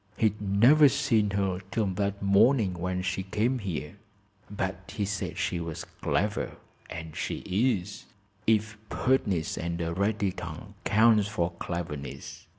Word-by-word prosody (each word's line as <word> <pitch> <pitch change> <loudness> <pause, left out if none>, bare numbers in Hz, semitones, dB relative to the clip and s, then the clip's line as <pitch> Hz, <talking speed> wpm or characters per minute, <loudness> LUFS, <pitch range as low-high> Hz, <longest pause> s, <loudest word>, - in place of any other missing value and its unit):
He'd 105 -2 +1
never 120 +10 +6
seen 115 -7 +2
her 95 -2 0
'till 110 +1 0
that 100 +1 -2
morning 100 +1 +4
when 90 +1 -2
she 95 +1 -1
came 110 +7 0
here. 90 -3 -5 0.5
But 95 -2 -4
he 105 - 0
said 100 -1 -3
she 85 - -1
was 80 -1 -5
clever, 100 +9 -1 0.4
and 80 -1 -7
she - - -3
is, 100 -2 0 0.4
if 110 -1 +2
pertness 100 -11 +1
and 85 0 -3
a 85 0 -1
ready 100 +1 +1
tongue 90 +4 -8
counts 110 -1 +5
for 90 -5 -1
cleverness. 85 -5 -6
100 Hz, 140 wpm, -28 LUFS, 90-110 Hz, 0.5 s, never